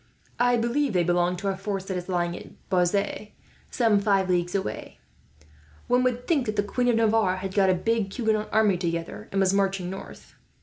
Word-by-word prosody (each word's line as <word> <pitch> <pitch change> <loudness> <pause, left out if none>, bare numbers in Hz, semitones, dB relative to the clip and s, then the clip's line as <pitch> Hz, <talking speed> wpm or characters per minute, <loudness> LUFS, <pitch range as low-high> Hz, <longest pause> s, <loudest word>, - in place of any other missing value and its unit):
I 245 0 +3
believe 235 +3 0
they 180 -2 +2
belong 175 +1 +1
to 200 +2 -4
a 195 - -1
force 195 0 -4
that 190 - -4
is 180 +1 -5
lying 175 -1 -1
at - - -13
Bazas, 195 +3 0 0.4
some 225 -5 +2
five 195 -2 +1
leagues 175 +1 0
away. 190 - -4 0.9
One 250 +1 +2
would 250 -1 -1
think 285 -8 +1
that 215 - -2
the 205 - +1
Queen 245 +4 -1
of 240 - +3
Navarre 220 -4 +2
had 190 0 -5
got 195 -1 +3
a 185 - +4
big 220 +1 -1
Huguenot 220 -2 -1
army 210 -3 +3
together, 170 -1 -4
and 195 - 0
was 190 0 +3
marching 195 -2 0
north." 190 - -10
195 Hz, 200 wpm, -25 LUFS, 185-225 Hz, 0.9 s, a